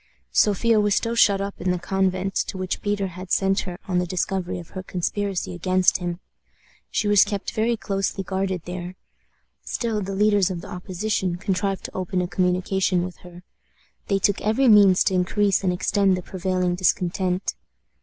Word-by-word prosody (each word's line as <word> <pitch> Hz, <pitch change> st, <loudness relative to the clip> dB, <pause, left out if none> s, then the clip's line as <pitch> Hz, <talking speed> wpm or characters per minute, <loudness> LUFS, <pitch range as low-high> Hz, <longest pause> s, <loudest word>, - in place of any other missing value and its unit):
Sophia 215 Hz, +2 st, +3 dB
was 205 Hz, -1 st, +2 dB
still 230 Hz, -, 0 dB
shut 200 Hz, -4 st, +4 dB
up 200 Hz, 0 st, -5 dB
in 185 Hz, -, -1 dB
the 180 Hz, -, +1 dB
convent 190 Hz, +1 st, -1 dB
to -, -, -2 dB
which 185 Hz, -1 st, -3 dB
Peter 205 Hz, -1 st, -1 dB
had 185 Hz, 0 st, -8 dB
sent 195 Hz, 0 st, +2 dB
her 180 Hz, -2 st, -5 dB
on 180 Hz, -2 st, +1 dB
the 180 Hz, -, -1 dB
discovery 185 Hz, +1 st, -2 dB
of 170 Hz, -2 st, -9 dB
her 185 Hz, -, -6 dB
conspiracy 190 Hz, +1 st, -2 dB
against 185 Hz, +1 st, +2 dB
him. 175 Hz, -1 st, -4 dB, 0.7 s
She 210 Hz, -, -1 dB
was 205 Hz, -1 st, +6 dB
kept 205 Hz, -1 st, -4 dB
very 230 Hz, +1 st, 0 dB
closely 195 Hz, -1 st, -2 dB
guarded 190 Hz, -2 st, -2 dB
there. 180 Hz, 0 st, -6 dB, 0.7 s
Still, 225 Hz, -3 st, -2 dB
the 195 Hz, 0 st, -4 dB
leaders 205 Hz, -2 st, +3 dB
of 175 Hz, -3 st, -4 dB
the -, -, -10 dB
opposition 185 Hz, 0 st, -2 dB
contrived 195 Hz, +1 st, -2 dB
to -, -, -8 dB
open 185 Hz, 0 st, -2 dB
a 180 Hz, -, 0 dB
communication 180 Hz, 0 st, +1 dB
with 180 Hz, 0 st, -6 dB
her. 175 Hz, 0 st, -14 dB, 0.6 s
They 195 Hz, -, +2 dB
took 200 Hz, 0 st, +1 dB
every 220 Hz, +6 st, +2 dB
means 200 Hz, -4 st, +6 dB
to -, -, +1 dB
increase 195 Hz, +2 st, +1 dB
and 185 Hz, -, +2 dB
extend 190 Hz, +1 st, +2 dB
the 180 Hz, -, -6 dB
prevailing 185 Hz, -1 st, -1 dB
discontent. 180 Hz, +1 st, 0 dB
190 Hz, 175 wpm, -23 LUFS, 180-200 Hz, 0.7 s, was